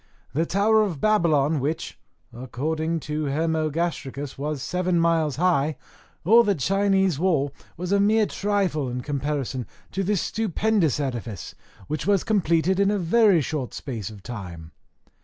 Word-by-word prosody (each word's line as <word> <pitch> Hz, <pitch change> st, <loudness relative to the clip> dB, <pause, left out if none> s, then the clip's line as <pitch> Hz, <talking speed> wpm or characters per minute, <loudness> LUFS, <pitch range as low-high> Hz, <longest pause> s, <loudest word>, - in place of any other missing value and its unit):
The 165 Hz, +4 st, 0 dB
tower 215 Hz, +3 st, +3 dB
of 185 Hz, -9 st, -1 dB
Babylon, 160 Hz, -8 st, +2 dB
which, 155 Hz, +5 st, -3 dB, 0.3 s
according 155 Hz, +7 st, -3 dB
to 150 Hz, +1 st, -3 dB
Hermogastricus, 155 Hz, -2 st, -2 dB
was 145 Hz, -1 st, -4 dB
seven 180 Hz, -1 st, 0 dB
miles 165 Hz, -4 st, +2 dB
high, 155 Hz, -3 st, +1 dB, 0.5 s
or 230 Hz, +6 st, +7 dB
the 205 Hz, -3 st, +1 dB
Chinese 195 Hz, 0 st, +1 dB
wall, 155 Hz, -6 st, +1 dB, 0.2 s
was 180 Hz, +2 st, -4 dB
a 200 Hz, -, +4 dB
mere 215 Hz, +2 st, +4 dB
trifle, 195 Hz, -10 st, -1 dB
in 125 Hz, +1 st, -4 dB
comparison 140 Hz, -2 st, -3 dB, 0.2 s
to 195 Hz, -, -2 dB
this 200 Hz, 0 st, +1 dB
stupendous 210 Hz, -, 0 dB
edifice, 120 Hz, -, -4 dB, 0.3 s
which 155 Hz, -, -4 dB
was 200 Hz, -3 st, +3 dB
completed 185 Hz, -3 st, +1 dB
in 200 Hz, 0 st, +4 dB
a 205 Hz, -, +1 dB
very 195 Hz, 0 st, +4 dB
short 140 Hz, -3 st, -4 dB
space 115 Hz, -8 st, -5 dB
of 105 Hz, -3 st, -12 dB
time. 90 Hz, -9 st, -8 dB
160 Hz, 140 wpm, -24 LUFS, 140-195 Hz, 0.5 s, or